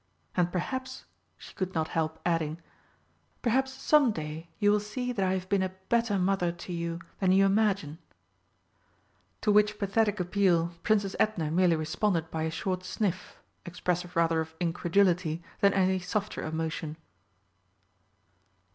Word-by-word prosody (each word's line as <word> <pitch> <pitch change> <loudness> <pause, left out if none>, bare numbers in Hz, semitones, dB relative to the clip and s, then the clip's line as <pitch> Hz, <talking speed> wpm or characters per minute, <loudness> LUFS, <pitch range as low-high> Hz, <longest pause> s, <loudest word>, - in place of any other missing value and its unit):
And 175 -1 +2
perhaps," 260 +9 -4 0.3
she - - -13
could 185 - -2
could 185 - -18
not 160 -1 0
help 160 -1 -1
adding, 165 -2 0 0.8
"perhaps 265 +3 +2
some 285 0 +4
day 160 -1 -6
you 205 -1 +4
will 210 - +3
see 250 +4 -4
that 200 -5 0
I 185 0 +2
have 185 -1 -3
been 200 0 +2
a 185 0 -2
better 230 -3 +2
mother 185 -2 +1
to 175 +1 -8
you 170 0 -3 0.2
than 190 -2 +3
you 195 +1 +5
imagine!" 195 -6 +1 1.4
To 215 - +2
which 210 0 +4
pathetic 205 0 +1
appeal 180 -2 +2
Princess 205 -3 +1
Edna 170 -8 +1
merely 175 0 +4
responded 165 +1 -1
by 160 - -2
a - - -1
short 185 +3 -3
sniff, 185 -1 -3 0.3
expressive 180 0 -3
rather 165 -1 +3
of 160 0 -7
incredulity 175 -1 +1 0.2
than 200 - +5
any 190 -1 +3
softer 200 +3 -3
emotion. 160 -1 -3
185 Hz, 145 wpm, -29 LUFS, 165-205 Hz, 1.4 s, you